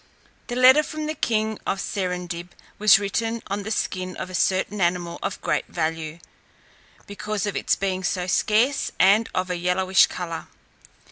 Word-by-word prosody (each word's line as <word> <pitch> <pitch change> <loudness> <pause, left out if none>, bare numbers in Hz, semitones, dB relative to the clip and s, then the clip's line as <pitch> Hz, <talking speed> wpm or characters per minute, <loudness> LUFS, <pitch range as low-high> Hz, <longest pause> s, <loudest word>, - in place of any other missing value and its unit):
The 245 - -4
letter 255 +4 +7
from 310 0 -5
the 310 - -2
king 220 -6 -1
of 195 - -1
Serendib 180 -3 -4 0.3
was 210 -1 +7
written 225 +3 -2
on 200 +1 -3
the 205 - -6
skin 185 -4 -2
of 185 - -6
a - - -10
certain 190 +2 0
animal 175 -1 0
of - - -3
great 150 -4 -1
value, 160 -1 -3 0.9
because 205 0 -4
of 205 - -3
its - - +1
being 190 -1 -2
so 180 0 -1
scarce, 220 +8 +1
and 200 +5 +5
of 185 0 -1
a 180 - -1
yellowish 185 +2 +3
colour. 170 -2 -6
190 Hz, 160 wpm, -24 LUFS, 180-215 Hz, 0.9 s, letter